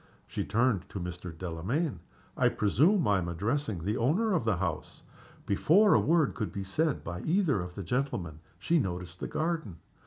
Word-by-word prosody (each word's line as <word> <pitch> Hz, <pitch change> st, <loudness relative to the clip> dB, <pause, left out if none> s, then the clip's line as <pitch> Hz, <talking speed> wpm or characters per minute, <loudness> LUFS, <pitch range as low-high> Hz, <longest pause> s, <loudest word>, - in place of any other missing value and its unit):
She -, -, -3 dB
turned 105 Hz, -4 st, +1 dB
to 100 Hz, -, -5 dB
Mr. 90 Hz, 0 st, -6 dB
Delamayn. 95 Hz, -, -2 dB, 0.4 s
"I -, -, +3 dB
presume 155 Hz, -, +3 dB
I 100 Hz, -2 st, +3 dB
am 85 Hz, -, -3 dB
addressing 105 Hz, -, -2 dB
the 105 Hz, +4 st, 0 dB
owner 180 Hz, -, +2 dB
of 160 Hz, -11 st, 0 dB
the 110 Hz, -5 st, +2 dB
house?" 85 Hz, -4 st, -4 dB, 0.4 s
Before 180 Hz, -, +4 dB
a -, -, +6 dB
word 160 Hz, -3 st, +2 dB
could 110 Hz, -3 st, -3 dB
be 100 Hz, -, -4 dB
said 150 Hz, +10 st, 0 dB
by 90 Hz, +1 st, -5 dB
either 160 Hz, -, +1 dB
of 90 Hz, 0 st, -7 dB
the 100 Hz, -, -5 dB
gentlemen 95 Hz, -, -2 dB, 0.2 s
she 170 Hz, 0 st, +2 dB
noticed 90 Hz, -, -4 dB
the -, -, -3 dB
garden. 160 Hz, -, -2 dB
105 Hz, 180 wpm, -30 LUFS, -, 0.4 s, a